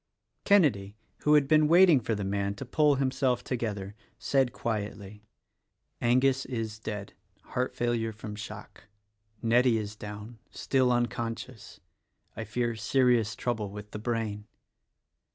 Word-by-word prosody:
Kenedy 120 - +3
— - - -43
who 150 0 +4
had 145 -2 +4
been 155 +1 +5
waiting 170 -2 +6
for 115 -1 -2
the 100 - -3
man 100 +1 -1
to 135 - -7
pull 150 +3 +3
himself 130 -1 0
together 105 -5 -3 0.2
— - - -40
said 135 -3 +3
quietly, 105 -2 -5 0.8
"Angus 130 +2 +3
is 115 -4 -4
dead: 105 -2 -6 0.3
heart 125 +1 -3
fail 120 0 0
ure 115 -1 -1
from 105 -1 -8
shock. 105 - -10 0.6
Nettie 120 +1 +4
is 105 -1 -5
down 105 +2 -9
— - - -39
still 130 -2 +1
unconscious. 120 -1 -3 0.5
I - - -5
fear 120 +2 -1
serious 120 -1 +2
trouble 110 -4 -2
with 105 +1 -9
the 105 - -6
brain." 110 -2 -3
115 Hz, 145 wpm, -28 LUFS, 105-130 Hz, 0.8 s, waiting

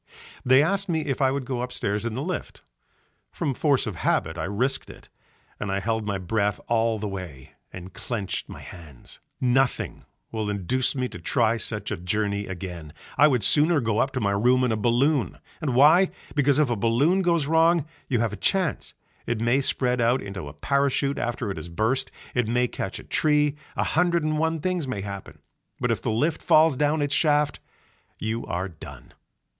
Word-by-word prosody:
They 130 +2 +5
asked 195 +4 -1
me 160 -2 +1
if 140 -3 -3
I 135 - +4
would 135 0 -2
go 125 -1 -3
upstairs 115 -3 -2
in 110 - -4
the 135 - -3
lift, 180 +1 -5 0.7
from 140 - -2
force 140 0 +2
of 105 -7 -5
habit 80 -1 0
I 80 - -3
risked 125 +8 -1
it, - - -14 0.5
and 105 - -3
I 100 - 0
held 110 +1 -2
my 100 -1 -1
breath 100 +2 -1
all 115 -1 +1
the 105 0 -4
way 90 -9 -8 0.2
and 95 0 -9
clenched 100 -2 -4
my - - -9
hands. 75 -7 -12 0.2
Nothing 130 +1 0 0.3
will 110 -2 -2
induce 105 +8 0
me 130 -1 -1
to 90 - -9
try 110 +7 +1
such 110 - -2
a - - -2
journey 100 +3 -1
again. 90 -4 -7 0.2
I 150 - +6
would 125 -7 +1
sooner 155 - +5
go 115 -4 0
up 135 - +2
to 130 - -1
my 100 -4 +1
room 125 +6 +3
in 125 - +2
a - - +1
balloon. 120 +6 +1 0.2
And 140 -6 -1
why? 160 +8 +6 0.2
Because 145 -1 +3
if 150 -5 +2
a - - +1
balloon 120 - +2
goes 170 -5 +2
wrong 165 +1 +3 0.2
you 120 -4 +1
have 115 -3 0
a - - -5
chance, 185 -7 -1 0.3
it 120 -2 -1
may 120 +4 +2
spread 125 -2 +1
out 120 +3 +3
into 100 -7 -7
a 70 - -9
parachute 140 0 0
after 120 -3 -2
it 95 - -6
has 80 +2 -7
burst, 115 +9 0 0.2
it 125 -3 +1
may 125 +2 +2
catch - - -5
in - - -12
a - - -24
tree, 150 -1 +2 0.2
a - - +1
hundred 170 0 +2
and 155 0 0
one 160 0 0
things 180 -4 -1
may 105 -6 -3
happen, 100 -1 -8 0.4
but - - 0
if - - -1
the - - -2
lift 145 +9 0
falls 155 -2 +5
down 150 +2 +1
its 145 0 -1
shaft 150 -2 +2 0.6
you 110 +1 -3
are 90 +2 -2
done. 80 -4 -12
125 Hz, 200 wpm, -25 LUFS, 105-145 Hz, 0.7 s, I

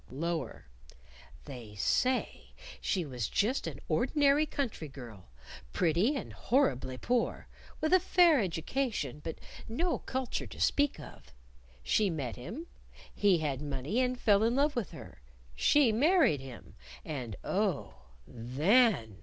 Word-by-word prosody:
Lower 165 +5 -4 0.8
"They 120 -7 -9
say 250 - 0 0.3
she 180 -4 -1
was 125 -6 -4
just 235 +7 0
an - - -6
ordinary 295 0 +2
country 240 - -3
girl, 120 - -11 0.4
pretty, 180 - +2
and 275 - -5
horribly 130 - 0
poor, 245 - -1 0.3
with 315 +3 +1
a 370 - +7
fair 345 -4 +4
education, 180 - -2
but 160 - -5 0.3
no 335 +9 -1
culture 260 -1 -3
to - - -11
speak 285 - +2
of. 145 - -13 0.5
She 210 - +2
met 140 -9 -3
him; 210 - -7 0.5
he 200 -3 +3
had 145 -4 -2
money 145 - -2
and 250 -1 0
fell 205 -2 +4
in 230 +2 +2
love 290 +2 +2
with 240 -5 -2
her; - - -12 0.3
she 255 - +4
married 280 - +3
him. 130 -4 -11 0.3
And, 125 -9 -5
oh, 195 -6 -1 0.3
_then! 130 - +2
195 Hz, 130 wpm, -31 LUFS, -, 0.8 s, a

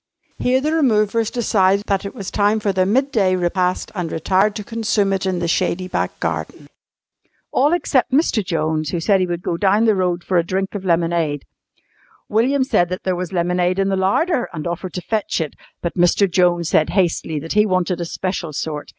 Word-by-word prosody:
Here 255 +1 +2
the 305 +3 0
removers 225 -7 +2
decided 200 -4 +1
that 195 0 -1
it 200 - -6
was 195 -2 -6
time 205 +2 +2
for 200 -2 -1
their 185 0 +1
midday 220 -5 +2
repast 180 0 -1
and 180 -5 -4
retired 190 +6 +1
to 210 - -5
consume 220 -3 0
it 190 0 -1
in 185 -1 0
the 175 -1 -2
shady 185 +2 0
back - - -3
garden. - - -4 0.8
All 285 +4 +3
except 285 -7 +1
Mr. 265 -6 +2
Jones, 155 -3 -1
who 175 - -2
said 195 +4 +2
he 185 - +1
would 175 0 -4
go 170 - -2
down 205 +4 +3
the 220 - +4
road 180 -2 -1
for 185 -2 +1
a - - +1
drink 190 +3 -2
of 200 -2 -5
lemonade. 165 -4 0 0.8
William 260 +6 +2
said 175 -9 +1
that 185 - -5
there 185 -1 0
was 180 0 -4
lemonade 180 0 0
in 195 0 +1
the 195 - +1
larder 240 - +1
and 155 -4 -6
offered 175 +1 -4
to 180 - -4
fetch 215 0 -2
it, 160 -3 -3 0.3
but 170 - -2
Mr. 175 +3 +3
Jones 175 -2 +2
said 155 - +2
hastily 175 -4 0
that 160 +3 -4
he 210 +1 +4
wanted 180 -2 0
a - - -2
special 175 -2 -4
sort. 150 0 -4
185 Hz, 200 wpm, -20 LUFS, 175-210 Hz, 0.8 s, the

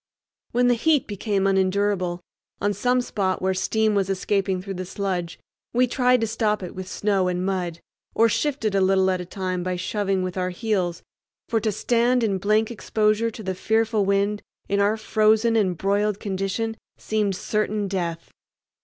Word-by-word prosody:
When 245 +1 +3
the 245 - +5
heat 295 +3 +2
became 200 -1 -1
unendurable, 190 -2 +1 0.4
on 205 0 +1
some 250 +3 +1
spot 195 -6 -1
where 190 0 0
steam 215 +3 +1
was 195 -2 +1
escaping 195 0 0
through 195 +1 -6
the 185 0 -4
sludge, 180 -3 -3 0.4
we 250 +1 +5
tried 250 -1 +2
to - - +2
stop 210 -2 0
it 180 - -6
with 185 0 -7
snow 195 -2 0
and 180 0 -1
mud, 180 -3 -2 0.3
or 230 - +5
shifted 230 -3 0
a 195 - +2
little 190 0 +3
at 185 -1 -1
a - - -6
time 185 0 -3
by 185 0 -2
shoving 190 +1 -1
with 185 0 -4
our 180 0 0
heels; 185 -3 -2 0.4
for 225 - +1
to 215 0 0
stand 240 +4 +2
in 200 -4 0
blank 215 +3 +2
exposure 215 0 +1
to 220 0 -9
the 190 -1 -2
fearful 220 +2 +1
wind 200 +1 +1 0.3
in 200 - 0
our 205 +2 +2
frozen 220 +1 +3
and 190 -6 +1
broiled 205 +3 0
condition 200 +3 -2 0.2
seemed 210 -3 -1
certain 210 +1 -1
death. 170 -3 -3
200 Hz, 175 wpm, -24 LUFS, 185-220 Hz, 0.4 s, the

